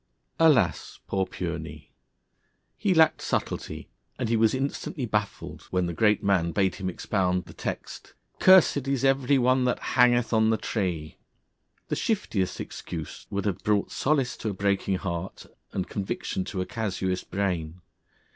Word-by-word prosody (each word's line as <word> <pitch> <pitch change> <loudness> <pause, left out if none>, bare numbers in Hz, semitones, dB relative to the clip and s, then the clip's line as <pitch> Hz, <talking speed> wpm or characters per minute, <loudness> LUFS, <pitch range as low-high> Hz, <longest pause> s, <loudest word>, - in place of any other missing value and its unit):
Alas! 130 - +3
Poor 95 -1 -1
Pureney! - - -6 0.8
He 205 -2 0
lacked 160 -1 +5
subtlety, - - -3 0.3
and 125 -3 -2
he 115 - +2
was 110 +2 +3
instantly 135 0 -3
baffled, 105 -2 -3
when 90 -1 +1
the 85 - -3
Great 105 +4 +2
Man 90 -4 +2
bade 95 -2 +2
him 95 -2 -2
expound 90 -1 -1
the - - -12
text: - - -6 0.2
'Cursed 180 -7 +6
is 135 -1 0
every 135 0 +3
one 130 0 +3
that 125 - +1 0.2
hangeth 120 -1 +4
on 110 0 +4
a 110 - +2
tree.' 85 -10 -3 0.7
The - - 0
shiftiest 95 - -1
excuse 80 -3 -7
would 100 0 -2
have 95 -3 -2
brought 105 -1 +1
solace 135 -3 +1
to 110 - -3
a - - -3
breaking 100 0 0
heart 90 -1 -5 0.3
and 95 - -3
conviction 95 -1 -3
to 95 - -3
a - - -2
casuist 95 -5 -3
brain. 90 -3 -2
100 Hz, 150 wpm, -27 LUFS, 95-125 Hz, 0.8 s, Cursed